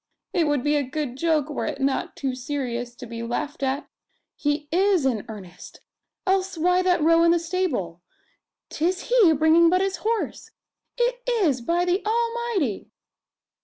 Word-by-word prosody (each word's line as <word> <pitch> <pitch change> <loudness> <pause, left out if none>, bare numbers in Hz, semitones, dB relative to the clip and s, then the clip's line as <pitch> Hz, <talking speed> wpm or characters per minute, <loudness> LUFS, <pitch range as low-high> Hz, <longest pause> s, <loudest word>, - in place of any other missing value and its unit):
It 340 -5 +2
would 290 -4 0
be 295 0 +2
a 290 - +2
good 270 -1 -4
joke 310 -1 +1
were 300 - -3
it - - -4
not 270 0 -1
too 270 -2 -2
serious 245 -3 -4
to 250 - -9
be 230 0 -7
laughed 245 +6 -4
at. 275 +3 -1 0.5
He 290 0 -1
is 370 -3 +3
in 235 -6 0
earnest, 195 -5 -11 0.4
else 380 -1 0
why 360 +3 +3
that 360 -4 +2
row 330 +1 +5
in 335 - +5
the 340 - +4
stable? 330 - -2 0.7
'Tis 360 +7 -2
he 450 -9 +6
bringing 320 +2 +5
but 365 +2 +3
his 385 0 -1
horse! 450 0 -2 0.5
It - - 0
is, 355 - +1
by 340 +8 +1
the 360 +3 0
Almighty!" 460 - -1
320 Hz, 165 wpm, -24 LUFS, 265-370 Hz, 0.7 s, he